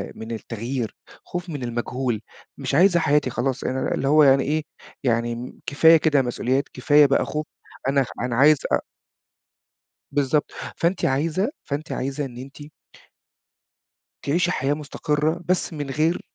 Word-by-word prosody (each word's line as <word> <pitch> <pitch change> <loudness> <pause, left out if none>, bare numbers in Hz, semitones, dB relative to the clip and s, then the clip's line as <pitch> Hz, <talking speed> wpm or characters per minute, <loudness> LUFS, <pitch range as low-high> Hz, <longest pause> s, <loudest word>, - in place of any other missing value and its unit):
من 110 +1 -8
التغيير، 115 +1 -4 0.3
خوف 175 0 -6
من 145 -5 -5
المجهول. 120 -1 -2 0.4
"مش - - -2
عايزة 175 +2 +5
حياتي 145 -3 +2
خلاص. 130 +2 -2
أنا 130 +1 -1
اللي 135 - -2
هو 150 +1 +6
أنا 135 0 +6
إيه، 155 +2 0 0.4
يعني 120 0 -1
كفاية 160 +3 +6
كده 150 -3 +3
مسؤوليات، 130 +2 0
كفاية 145 +3 +5
بقى 135 -1 +2
خوف. 150 0 -3 0.4
أنا 135 -1 +2 0.2
أنا 125 -1 -1
عايزة 145 +2 +5
أ" - - +4 1.3
بالضبط. 145 +1 +1 0.3
فأنتِ 175 +2 0
عايزة، 160 - 0
فأنتِ 145 +2 -5
عايزة 140 +2 -2
إن 120 -2 -9
أنتِ 135 +3 -10 1.6
تعيشي 170 +5 +1
حياة 140 -4 0
مُستقرة 150 +2 -1
بس 180 -1 0
من 145 -2 -5
غير 155 +5 +1
140 Hz, 140 wpm, -23 LUFS, 130-155 Hz, 1.6 s, هو